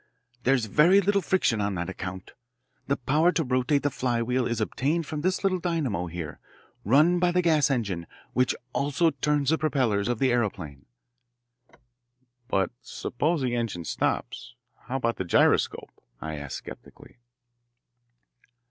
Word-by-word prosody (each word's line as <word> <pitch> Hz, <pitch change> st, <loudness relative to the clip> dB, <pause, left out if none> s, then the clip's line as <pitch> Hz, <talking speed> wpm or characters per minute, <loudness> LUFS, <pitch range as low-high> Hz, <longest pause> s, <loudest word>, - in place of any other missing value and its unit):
"There's 130 Hz, -3 st, +3 dB
very 165 Hz, -, +5 dB
little 200 Hz, 0 st, +2 dB
friction 160 Hz, -, +1 dB
on 100 Hz, -1 st, -1 dB
that 85 Hz, -1 st, -3 dB
account. 95 Hz, 0 st, -7 dB, 0.6 s
The 140 Hz, -, +1 dB
power 150 Hz, +7 st, +2 dB
to 165 Hz, -, +1 dB
rotate 130 Hz, +1 st, +1 dB
the 145 Hz, -, +1 dB
flywheel 125 Hz, -1 st, 0 dB
is 120 Hz, -1 st, -2 dB
obtained 145 Hz, +9 st, -1 dB
from 150 Hz, 0 st, -4 dB
this 185 Hz, +4 st, 0 dB
little 190 Hz, -2 st, +1 dB
dynamo 145 Hz, -, -1 dB
here, 80 Hz, -2 st, -6 dB, 0.4 s
run 155 Hz, -, +4 dB
by 180 Hz, 0 st, +3 dB
the 180 Hz, +1 st, +1 dB
gas 155 Hz, -4 st, +3 dB
engine 100 Hz, -, -2 dB, 0.3 s
which 125 Hz, 0 st, +2 dB, 0.2 s
also 145 Hz, +4 st, +1 dB
turns 145 Hz, 0 st, 0 dB
the 160 Hz, -, +2 dB
propellers 125 Hz, -10 st, +1 dB
of 120 Hz, -1 st, 0 dB
the 130 Hz, +2 st, +2 dB
aeroplane." 95 Hz, -, -2 dB, 1.6 s
"But 95 Hz, -7 st, 0 dB
suppose 150 Hz, +5 st, -2 dB
the 120 Hz, -1 st, 0 dB
engine 110 Hz, -8 st, -3 dB
stops, 75 Hz, -, -2 dB, 0.3 s
how 125 Hz, +3 st, -4 dB
about 115 Hz, -3 st, 0 dB
the -, -, -2 dB
gyroscope?" 85 Hz, -, +2 dB, 0.3 s
I 80 Hz, -1 st, -5 dB
asked 70 Hz, -1 st, -6 dB
sceptically. -, -, -12 dB
130 Hz, 145 wpm, -26 LUFS, 105-155 Hz, 1.6 s, very